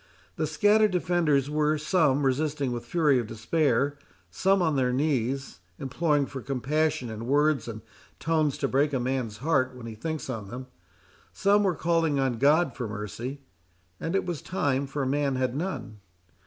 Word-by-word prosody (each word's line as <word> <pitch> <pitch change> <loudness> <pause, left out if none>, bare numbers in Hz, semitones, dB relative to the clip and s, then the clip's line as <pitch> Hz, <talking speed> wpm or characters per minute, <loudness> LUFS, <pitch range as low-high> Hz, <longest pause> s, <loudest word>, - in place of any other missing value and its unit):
The - - -1
scattered 215 0 +4
defenders 175 -7 +1
were, 150 +1 +1
some 150 -3 +2
resisting 140 0 0
with 120 -1 -3
the - - -22
fury 150 -6 +3
of 120 - -3
despair; 140 +5 0 0.3
some 195 - +2
on 160 -4 +1
their 130 -2 +2
knees, 135 - -1 0.2
imploring 145 +1 0
for 135 -1 -7
compassion 135 +2 -1
in 110 +2 -6
words 145 +1 +2
and 110 -2 -7 0.4
tones 155 -3 +1
to - - 0
break 145 +2 +1
a 130 - +1
man's 125 -4 -2
heart 130 -5 +2
when 125 -2 -9
he 115 - -6
thinks 155 +8 -4
on 110 -6 -5
them; 125 +5 -7 0.7
some 200 +1 +3
were 190 -4 +1
calling 165 -4 +1
on 130 -4 0
God 145 0 +3
for 125 -2 -4
mercy; 110 +6 -6 0.6
and 165 +3 -2
it 195 - +1
was 175 -4 -4
time, 140 -7 -1
for 140 0 -2
man 140 0 0
had 130 -1 -1
none. 150 - -4
140 Hz, 170 wpm, -27 LUFS, 125-155 Hz, 0.7 s, scattered